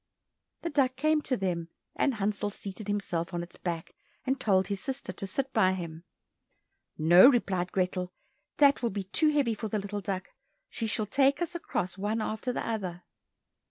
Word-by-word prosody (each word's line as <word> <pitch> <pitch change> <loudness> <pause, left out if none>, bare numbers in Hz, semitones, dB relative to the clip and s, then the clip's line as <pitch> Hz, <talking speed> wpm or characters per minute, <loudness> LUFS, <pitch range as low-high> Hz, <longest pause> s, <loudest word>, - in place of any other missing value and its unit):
The 335 - -2
duck 265 -3 +2
came 305 +3 +2
to 255 -3 -1
them, 175 -3 -2 0.3
and 275 -4 +1
Hansel 205 0 -1
seated 200 +1 -7
himself 190 -4 -2
on 170 - -2
its 175 - -11
back, 170 -2 -4 0.3
and 265 0 0
told 190 -3 +3
his 200 -1 -3
sister 270 0 -4
to 195 - -4
sit 270 +7 -2
by 190 -5 +4
him. 170 -2 -6 0.9
"No," 175 +7 +8
replied 190 -8 +1
Grethel, 180 -1 -1 0.5
"that 285 -2 +5
will 235 - +1
be 200 -1 -3
too 305 - +2
heavy 285 -6 +2
for 220 +1 -4
the 215 - -1
little 205 0 -4
duck; 190 -2 -3 0.4
she 225 - -2
shall 215 0 0
take 275 +6 +3
us 345 -1 -2
across, 195 - -3
one 210 +3 0
after 220 +3 -2
the - - -3
other." 185 -6 -3
205 Hz, 180 wpm, -29 LUFS, 185-255 Hz, 0.9 s, No